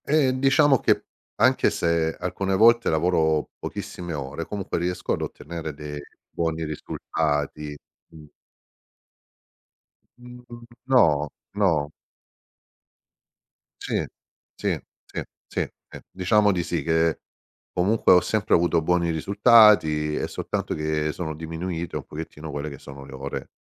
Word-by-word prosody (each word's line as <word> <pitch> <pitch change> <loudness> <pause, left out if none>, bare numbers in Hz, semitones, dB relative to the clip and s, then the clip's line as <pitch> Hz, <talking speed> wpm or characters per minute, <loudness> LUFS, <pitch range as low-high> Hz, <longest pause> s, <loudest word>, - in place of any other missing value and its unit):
Eh 140 -3 +3
diciamo 135 0 +4
che, - - +2 0.3
anche - - +4
se 85 -1 0
alcune 95 +2 -1
volte 115 +4 +5
lavoro 80 -2 +1
pochissime 85 -2 -6
ore, 70 +3 -5
comunque 100 -1 -3
riesco 90 +1 -1
ad - - -2
ottenere 80 -2 -6
dei 75 0 -7 0.3
buoni 80 -1 -2
risultati. 75 -1 -3 0.3
Mh. 80 -2 -14 1.9
Mhmm, 125 -1 -12 0.2
no. 75 - +4 0.2
No. 85 -8 +1 1.9
Sì, - - -2 0.5
sì, - - -2 0.3
sì, - - -5 0.3
sì, - - -2 0.4
diciamo 105 +3 +3
di 90 -3 0
sì, 85 0 -2
che 80 0 +1 0.5
comunque 95 +3 +3
ho 90 - +6
sempre 110 -3 0
avuto 85 -1 +2
buoni 85 0 +2
risultati. 90 -4 +5
È - - -2
soltanto - - -3
che 75 0 -1
sono 80 -2 -5
diminuite 80 +2 -5
un - - -4
pochettino 80 0 -8
quelle 75 +2 -4
che 70 - -9
sono 70 0 -11
le 70 - -12
ore, 70 +1 -6
85 Hz, 120 wpm, -24 LUFS, 75-100 Hz, 1.9 s, ho